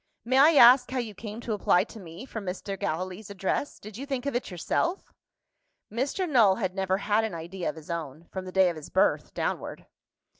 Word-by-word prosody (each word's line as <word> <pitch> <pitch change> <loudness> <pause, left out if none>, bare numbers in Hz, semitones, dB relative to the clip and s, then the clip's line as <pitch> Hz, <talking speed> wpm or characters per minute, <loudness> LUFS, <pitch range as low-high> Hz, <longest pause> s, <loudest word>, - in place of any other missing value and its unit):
"May 260 +3 +3
I 300 +4 +8
ask 250 0 +8
how 260 - -3
you 230 -4 -3
came 215 +2 -8
to 230 - -3
apply 185 -3 +3
to 225 +1 -12
me 175 +4 -10
for 225 -4 -6
Mr. 195 +1 -4
Gallilee's 185 +2 -4
address? 200 +8 -2
Did 210 0 -10
you 275 +3 -6
think 270 -2 -3
of 280 - -2
it 245 - -2
yourself?" 335 - -2 0.8
Mr. 275 - -1
Null 230 - +5
had 190 -4 -2
never 190 -1 0
had 210 +2 +1
an 220 -6 -3
idea 170 +2 -4
of - - -5
his 160 +1 -9
own, 160 -1 -5
from 190 -1 -5
the 185 - -7
day 190 0 +4
of - - -8
his 155 - -9
birth, - - +2
downward. - - -3
205 Hz, 215 wpm, -27 LUFS, 185-245 Hz, 0.8 s, I